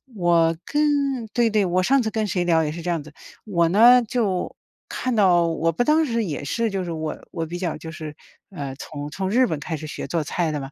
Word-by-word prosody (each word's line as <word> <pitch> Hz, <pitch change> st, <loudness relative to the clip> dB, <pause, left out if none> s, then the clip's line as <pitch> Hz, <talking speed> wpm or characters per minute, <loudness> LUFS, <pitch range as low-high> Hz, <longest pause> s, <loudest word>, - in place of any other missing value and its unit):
我 170 Hz, -3 st, +3 dB
跟 295 Hz, -, -1 dB, 0.5 s
对 235 Hz, -2 st, +3 dB
对， 210 Hz, -2 st, +2 dB
我 185 Hz, +1 st, +1 dB
上 270 Hz, +8 st, +3 dB
次 220 Hz, -, -2 dB
跟 215 Hz, -1 st, -1 dB
谁 180 Hz, -2 st, 0 dB
聊 165 Hz, -2 st, +3 dB
也 150 Hz, -, -2 dB
是 170 Hz, +2 st, -7 dB
这 175 Hz, -, -3 dB
样 165 Hz, -3 st, -2 dB
子。 150 Hz, 0 st, -14 dB, 0.3 s
我 170 Hz, -6 st, +2 dB
呢， 235 Hz, +7 st, +7 dB
就， 210 Hz, -5 st, -1 dB, 0.3 s
看 255 Hz, -2 st, -2 dB
到 180 Hz, -5 st, +4 dB
我 165 Hz, 0 st, 0 dB
不 165 Hz, -, 0 dB
当 305 Hz, +5 st, +3 dB
时 230 Hz, -3 st, -1 dB
也 150 Hz, -7 st, -4 dB
是， 230 Hz, +9 st, -1 dB
就 195 Hz, -1 st, -2 dB
是 175 Hz, -, -5 dB
我 160 Hz, -1 st, -3 dB, 0.2 s
我 165 Hz, -1 st, -3 dB
比 175 Hz, +2 st, -6 dB
较 175 Hz, -3 st, -2 dB
就 160 Hz, +1 st, -8 dB
是， 155 Hz, -1 st, -8 dB, 0.3 s
呃， 140 Hz, -8 st, -6 dB
从 145 Hz, 0 st, -7 dB
从 190 Hz, +3 st, -3 dB
日 250 Hz, +5 st, +4 dB
本 155 Hz, -, -3 dB
开 160 Hz, +3 st, -4 dB
始 155 Hz, -, -8 dB
学 -, -, -6 dB
做 165 Hz, -2 st, -1 dB
菜 160 Hz, +2 st, -1 dB
的 150 Hz, -, -2 dB
嘛， 135 Hz, 0 st, -8 dB
175 Hz, 260 characters per minute, -23 LUFS, 160-215 Hz, 0.5 s, 呢